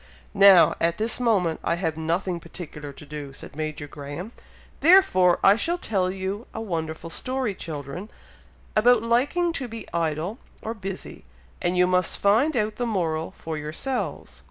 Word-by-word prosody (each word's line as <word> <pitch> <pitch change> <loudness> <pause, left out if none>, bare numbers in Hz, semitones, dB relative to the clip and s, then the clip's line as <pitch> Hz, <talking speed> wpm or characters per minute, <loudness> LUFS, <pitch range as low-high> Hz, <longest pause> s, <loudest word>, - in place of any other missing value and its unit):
"Now, 195 -4 +7
at 170 0 +1
this 220 +2 0
moment, 200 -9 +2
I - - +1
have 165 -3 -2
nothing 170 +3 -1
particular 150 -4 -8
to 145 +2 -13
do," 145 -2 -7
said 135 - -10
Major 155 -1 -4
Graham, 145 +8 -7 0.5
"therefore 300 - +6
I 195 - +7
shall 340 +9 0
tell 195 - 0
you 190 +3 -4
a - - -3
wonderful 165 -5 -4
story, 255 +1 -2
children, 160 +3 -6 0.7
about 230 +1 +5
liking 285 +9 +1
to 265 -5 -4
be 225 -1 -8
idle 165 - -1 0.2
or 225 - -3
busy, 195 -3 -7 0.4
and 175 +1 0
you 180 - +5
must 180 0 +1
find 240 +9 +3
out 215 -1 0
the 245 - -1
moral 165 -7 -1
for 160 -1 -5
yourselves." 165 - -4
185 Hz, 155 wpm, -25 LUFS, 160-225 Hz, 0.7 s, Now